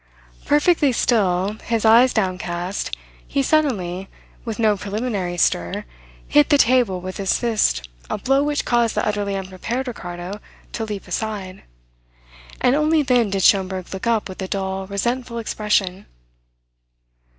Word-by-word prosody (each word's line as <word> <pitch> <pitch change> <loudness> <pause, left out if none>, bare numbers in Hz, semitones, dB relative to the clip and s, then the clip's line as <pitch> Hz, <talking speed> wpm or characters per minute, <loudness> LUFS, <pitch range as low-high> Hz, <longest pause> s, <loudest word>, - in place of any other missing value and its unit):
Perfectly 295 -1 +3
still, 200 -3 +1
his 230 -1 -1
eyes 235 +3 +6
downcast, 185 -2 -2 0.3
he 275 - 0
suddenly, 195 - 0 0.3
with 225 -3 -4
no 215 -2 +3
preliminary 200 -3 -3
stir, 85 - 0 0.4
hit 150 - +4
the 290 - +5
table 245 -8 +3
with 185 +1 -6
his 195 -1 +1
fist 210 - +1 0.2
a - - -1
blow 270 +1 +2
which 290 0 -1
caused 235 -2 +2
the - - 0
utterly 205 -1 -1
unprepared 195 +7 -4
Ricardo 180 -3 -6 0.3
to 225 - -3
leap 210 -3 -6
aside. 190 0 -4 1.0
And 250 - +4
only 305 +1 +3
then 245 -5 +2
did 195 -1 -1
Schomberg 190 -2 +2
look 190 +4 -4
up 230 -2 +1
with 185 0 -8
a 190 - -3
dull, 190 0 -3
resentful 235 +4 -2
expression. 210 -4 -1
210 Hz, 140 wpm, -21 LUFS, 185-240 Hz, 1.0 s, eyes